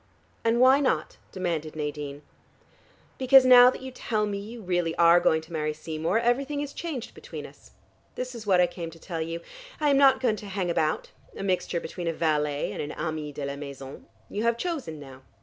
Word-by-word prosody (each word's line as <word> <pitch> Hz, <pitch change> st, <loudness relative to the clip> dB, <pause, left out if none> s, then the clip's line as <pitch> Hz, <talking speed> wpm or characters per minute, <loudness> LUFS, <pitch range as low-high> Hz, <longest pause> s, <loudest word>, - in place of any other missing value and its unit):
"And 230 Hz, +1 st, +2 dB
why 260 Hz, +2 st, +6 dB
not?" 280 Hz, -, 0 dB
demanded 165 Hz, -5 st, -3 dB
Nadine. 150 Hz, -1 st, -5 dB, 1.0 s
"Because 265 Hz, 0 st, +7 dB
now 250 Hz, -1 st, +9 dB
that 260 Hz, -, -6 dB
you 260 Hz, -, -6 dB
tell 215 Hz, -4 st, -1 dB
me 200 Hz, -1 st, -3 dB
you 225 Hz, +4 st, -8 dB
really 175 Hz, -4 st, -1 dB
are 170 Hz, +1 st, +6 dB
going 160 Hz, -2 st, +2 dB
to 160 Hz, +1 st, -14 dB
marry 155 Hz, -1 st, -1 dB
Seymour, 160 Hz, +5 st, -2 dB
everything 270 Hz, +5 st, 0 dB
is 285 Hz, -1 st, -4 dB
changed 300 Hz, -9 st, -5 dB
between -, -, -8 dB
us. -, -, -15 dB, 0.5 s
This 255 Hz, 0 st, -4 dB
is 225 Hz, -3 st, -9 dB
what 185 Hz, -2 st, +4 dB
I 180 Hz, -, +6 dB
came 175 Hz, -1 st, -6 dB
to 165 Hz, 0 st, -14 dB
tell 165 Hz, -1 st, -5 dB
you. 165 Hz, +1 st, -4 dB, 0.4 s
I 300 Hz, -1 st, +2 dB
am 275 Hz, -, +4 dB
not 275 Hz, -1 st, +6 dB
going 235 Hz, -4 st, +1 dB
to 210 Hz, -, -9 dB
hang 190 Hz, -3 st, -2 dB
about, 155 Hz, -2 st, -1 dB, 0.3 s
a -, -, -5 dB
mixture 185 Hz, -2 st, 0 dB
between 175 Hz, 0 st, -6 dB
a 165 Hz, -, 0 dB
valet 150 Hz, -3 st, 0 dB
and -, -, -4 dB
an 150 Hz, +1 st, -5 dB
ami 155 Hz, -1 st, -4 dB
de 145 Hz, 0 st, -5 dB
la 140 Hz, 0 st, -4 dB
maison. 140 Hz, -1 st, -9 dB, 0.2 s
You 205 Hz, -, -4 dB
have 235 Hz, 0 st, +1 dB
chosen 275 Hz, -, -4 dB
now. 135 Hz, -2 st, -12 dB
175 Hz, 205 wpm, -27 LUFS, 155-240 Hz, 1.0 s, now